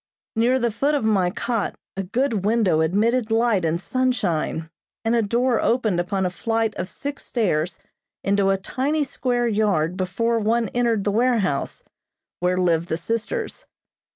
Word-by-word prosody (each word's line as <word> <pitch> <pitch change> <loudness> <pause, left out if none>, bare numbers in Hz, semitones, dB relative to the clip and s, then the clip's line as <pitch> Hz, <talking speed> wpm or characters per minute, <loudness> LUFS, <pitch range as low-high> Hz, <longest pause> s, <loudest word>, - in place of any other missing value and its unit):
Near 240 +3 +3
the 240 -2 0
foot 280 +7 +1
of 285 - 0
my 195 -5 +3
cot 225 +3 -2 0.2
a 195 - -2
good 220 +1 -1
window 205 -7 +2
admitted 220 +8 +1
light 225 -4 +2
and 165 +1 0
sunshine, 190 -10 -1 0.4
and 225 +1 +2
a 230 - +3
door 235 +3 +1
opened 220 -7 +1
upon 190 +2 -1
a 180 - 0
flight 225 +2 -1
of 185 - -5
six 285 0 -5
stairs 175 -7 0 0.5
into 200 0 +2
a 195 - +3
tiny 275 +10 -1
square 245 -3 -1
yard 200 -7 +1
before 200 +5 0
one 225 0 +1
entered 235 -4 +1
the 205 - +1
warehouse, 220 - 0 0.6
where 180 +1 +1
lived 170 -1 +1
the 160 - 0
sisters. 230 - -3
220 Hz, 155 wpm, -23 LUFS, 185-240 Hz, 0.6 s, Near